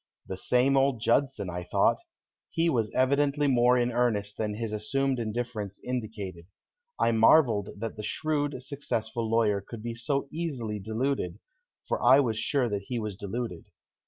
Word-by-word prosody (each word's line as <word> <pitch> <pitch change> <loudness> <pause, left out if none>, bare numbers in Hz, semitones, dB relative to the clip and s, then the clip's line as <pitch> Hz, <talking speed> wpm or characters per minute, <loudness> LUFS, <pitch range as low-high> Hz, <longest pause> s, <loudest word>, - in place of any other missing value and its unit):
The 95 - -5
same 125 +7 +2
old 135 -3 +2
Judson, 130 -2 +1
I 90 0 -4
thought. 90 - +2 0.5
He 165 0 +1
was 115 -6 +1
evidently 140 +2 +2
more 125 -2 +4
in 120 0 +1
earnest 110 -4 0
than 105 -1 -2
his 110 -1 -4
assumed 135 +5 0
indifference 110 -3 -4
indicated. 105 -8 -5 0.5
I - - +3
marveled 115 -2 +4
that 115 +1 -5
the 105 - -6
shrewd, 145 +2 -1
successful 120 -5 -3
lawyer 110 -3 +2
could 110 +2 -9
be 120 0 -3
so 140 +4 -2
easily 130 -11 -3
deluded, 110 -2 -2 0.5
for - - -1
I 130 +4 +7
was 115 -6 +1
sure 130 +2 +1
that 100 -3 -3
he 125 - -2
was 105 -3 -3
deluded. 100 -2 -5
115 Hz, 160 wpm, -28 LUFS, 105-135 Hz, 0.5 s, I